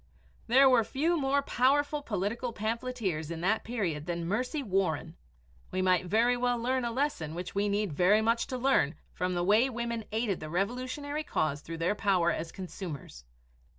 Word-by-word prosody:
There 265 +4 +6
were 250 -3 +5
few 290 +10 0
more 280 -2 +1
powerful 285 +4 +2
political 230 +1 -2
pamphleteers 220 -7 -2
in 165 -1 -5
that 205 +5 +1
period 180 -10 -2
than 170 -1 -2
Mercy 250 - -1
Warren. 180 - -1 0.5
We 185 0 -1
might 185 -1 +2
very 230 +6 +3
well 245 0 +1
learn 255 +2 0
a 235 - -1
lesson 230 - -2
which 180 +1 -5
we 205 +1 +1
need 200 -4 0
very 185 +8 +4
much 230 +1 +1
to 255 - -3
learn 250 - +2 0.2
from 180 0 -1
the 175 - 0
way 215 +8 +4
women 235 -2 -3
aided 215 -4 -1
the 155 - -7
Revolutionary 255 - -2
cause 150 - -1
through 165 +1 -7
their 165 +4 +1
power 190 -5 +2
as 165 0 -4
consumers. 170 - -8
215 Hz, 175 wpm, -30 LUFS, 180-250 Hz, 0.5 s, There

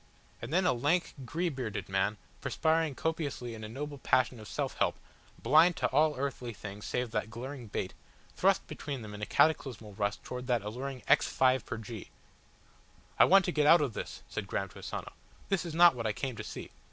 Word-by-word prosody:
And 115 - -6
then 180 +3 +3
a 180 - +4
lank, 145 +9 +1
grey 170 +8 -1
bearded 130 -8 -4
man, 95 +2 0 0.2
perspiring 160 -2 +1
copiously 145 -6 -2
in 110 -1 -8
a 110 - -6
noble 145 +4 -5
passion 130 -2 +2
of 110 - -10
self - - -3
help, - - +2 0.5
blind 160 +8 +6
to - - +2
all 150 +2 +3
earthly 130 -3 -3
things 105 0 -8
save 125 -2 -2
that 105 -1 -1
glaring 125 +2 -7
bait, 95 -2 -3 0.4
thrust - - +3
between 140 -5 -5
them 105 -1 -8
in 105 - -8
a 105 - -2
cataclysmal 125 -9 +1
rush 100 0 -1
towards 125 0 -6
that 120 -5 +1
alluring 125 +5 -5
"X - - +5
5 130 -2 +2
pr. 120 - -3
G." 115 -1 -8 1.1
"I - - +9
want 195 -1 +6
to 180 - 0
get 150 -3 +2
out 165 +1 +8
of 135 -6 0
this," - - -6
said 105 - -5
Graham 100 0 -2
to - - -13
Asano. - - -6 0.4
"This 195 -2 +1
is 160 - -5
not 175 0 +8
what 115 -3 -3
I 105 - 0
came 130 +2 -3
to 110 - -6
see. - - -7
125 Hz, 205 wpm, -31 LUFS, 110-150 Hz, 1.1 s, I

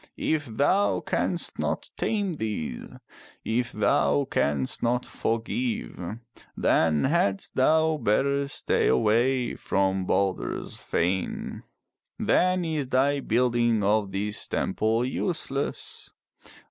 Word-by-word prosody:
If 155 -3 0
thou 145 - +2
canst - - -2
not - - -2
tame 205 -4 -1
these, 110 - -4 0.5
if 120 +2 0
thou 70 +1 +2
canst 70 -2 0
not 125 +1 +1
forgive, 225 - -2 0.6
then 80 -2 +2
hadst 135 - +1
thou 160 +4 +3
better 140 +4 +1
stay 140 - 0
away 120 - +2
from 95 -1 0
Balder's 100 -2 -1
fane. 90 +3 -2 0.6
Then 185 -1 +2
is 155 -5 -2
thy 140 +2 +2
building 120 -3 +2
of 100 0 +2
this 105 +2 -2
temple 110 +4 0
useless. 140 0 -3
120 Hz, 100 wpm, -26 LUFS, 100-145 Hz, 0.6 s, thou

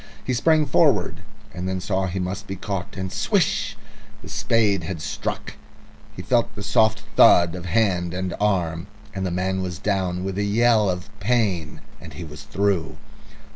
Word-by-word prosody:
He 130 - -1
sprang 155 +5 +3
forward, - - +2 0.3
and 90 +1 -4
then 95 0 -2
saw 95 +1 -1
he 90 +2 -4
must 95 +2 -3
be 95 - -4
caught, 95 -1 -5
and 95 -1 -4
swish! - - 0 0.5
the - - -10
spade 105 -5 +2
had 90 0 -4
struck. 80 - -4 0.6
He 90 - -7
felt 120 +4 +1
the 100 - -6
soft 110 +1 +2
thud 85 -1 +6
of 90 0 -6
hand 90 -4 +1
and 90 0 -3
arm, 85 -6 0 0.3
and 95 -2 -2
the - - -1
man 95 +2 -1
was 90 -3 -4
down 95 -2 -1
with 95 +1 -3
a - - +1
yell 110 0 +3
of 90 -1 -4
pain, 100 -8 0 0.2
and - - -11
he 90 - -7
was 75 -1 -9
through. 100 -5 -1
95 Hz, 175 wpm, -23 LUFS, 90-105 Hz, 0.6 s, thud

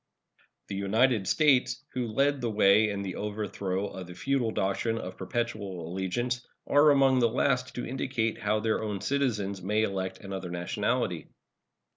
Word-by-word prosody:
The 100 - -3
United 105 +2 +2
States, 130 -4 +3
who 125 -2 -1
led 140 +5 +1
the 120 - 0
way 105 0 +4
in 100 -1 -3
the 95 -2 -5
overthrow 100 -2 -3
of 95 -3 -7
the 90 - -10
feudal 130 +3 0
doctrine 110 +2 -1
of 95 -4 -6
perpetual 100 -4 -3
allegiance, 120 +7 -2 0.2
are 145 +1 +5
among 135 -2 +5
the 120 -1 +4
last 125 +2 0
to 125 - -3
indicate 125 -3 -2
how 105 +1 +1
their 110 0 0
own 105 -3 -3
citizens 110 -9 -1
may 105 +4 +1
elect 95 -2 -2
another 95 -2 -6
nationality. 85 0 -1
110 Hz, 155 wpm, -28 LUFS, 95-125 Hz, 0.2 s, are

